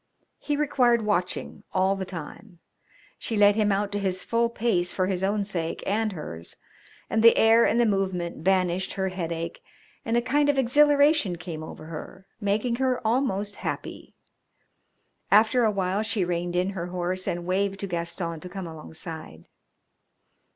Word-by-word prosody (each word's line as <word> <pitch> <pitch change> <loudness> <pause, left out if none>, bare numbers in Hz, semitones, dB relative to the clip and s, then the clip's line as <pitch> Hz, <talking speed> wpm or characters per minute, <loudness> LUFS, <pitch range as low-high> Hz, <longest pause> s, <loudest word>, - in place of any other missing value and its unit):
He 295 -1 -2
required 250 -6 +2
watching 185 -3 -1
all 190 +1 +2
the 190 -1 -4
time. 180 +3 -9 0.6
She 225 - -2
let 205 0 +6
him 210 -2 +2
out 200 +1 0
to 205 - -1
his 185 -2 -2
full 235 0 +1
pace 215 -7 0
for 185 - 0
his 185 -1 -2
own 200 +1 +1
sake 170 -5 -4
and 215 +1 0
hers, 85 - -7 0.5
and 220 - +1
the 230 0 +7
air 225 +1 +6
and 230 - +2
the 240 - +4
movement 185 -6 -1
banished 185 0 +1
her 190 -1 -1
headache, 170 -2 -4 0.4
and 230 +1 0
a - - +3
kind 290 +3 +2
of 285 - +2
exhilaration 285 - +4
came 170 -2 -7
over 155 0 -9
her, 165 +4 -9
making 215 +3 0
her 260 -1 +1
almost 210 -4 0
happy. - - -6 1.1
After 220 +4 +5
a 215 - +3
while 195 0 0
she 220 -4 0
reined 175 0 -2
in 180 +2 +1
her 175 -3 -4
horse 180 +1 -2
and 175 0 -2
waved 195 +2 0
to - - -2
Gaston 170 -1 -3
to 180 - -6
come 190 0 -6
alongside. 160 - -9
195 Hz, 165 wpm, -26 LUFS, 175-225 Hz, 1.1 s, the